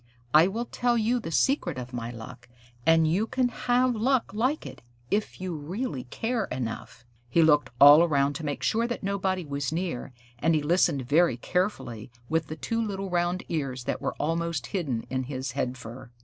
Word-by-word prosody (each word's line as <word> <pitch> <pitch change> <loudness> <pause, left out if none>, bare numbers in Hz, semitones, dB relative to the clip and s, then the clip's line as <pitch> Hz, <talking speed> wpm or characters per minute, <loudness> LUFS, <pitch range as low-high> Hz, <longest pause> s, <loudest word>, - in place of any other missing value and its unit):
I 155 +3 +7
will 225 +5 -3
tell 240 0 0
you 235 +2 +1
the 165 - -6
secret 175 - +1
of 125 0 -7
my 120 -1 -4
luck, 115 0 -10 0.4
and 165 -1 +5
you 190 +8 +1
can 255 +1 +1
have 250 +1 +1
luck 245 0 +1
like 255 +8 0
it, - - -9 0.3
if 210 +1 -1
you 185 -2 -4
really 155 - -4
care 225 - -2
enough." 120 -1 -6 0.2
He 165 +7 +4
looked 150 -4 +4
all 145 +3 +10
around 145 -4 +2
to 165 - -8
make 145 -1 -3
sure 230 +1 +1
that 240 - -4
nobody 190 -2 -1
was 140 -1 -3
near, 165 -6 -3 0.3
and 165 +4 +2
he 150 - +1
listened 165 -3 +2
very 155 -2 +3
carefully 130 - -2 0.2
with 160 0 0
the 155 - -5
two 230 +8 -2
little 195 -3 -3
round 175 +1 0
ears 135 -6 -3
that - - -3
were - - -2
almost 165 -3 -1
hidden 135 - -2
in 130 0 -1
his 130 -1 -4
head 125 -1 -2
fur. 120 +1 -10
165 Hz, 190 wpm, -27 LUFS, 135-205 Hz, 0.4 s, all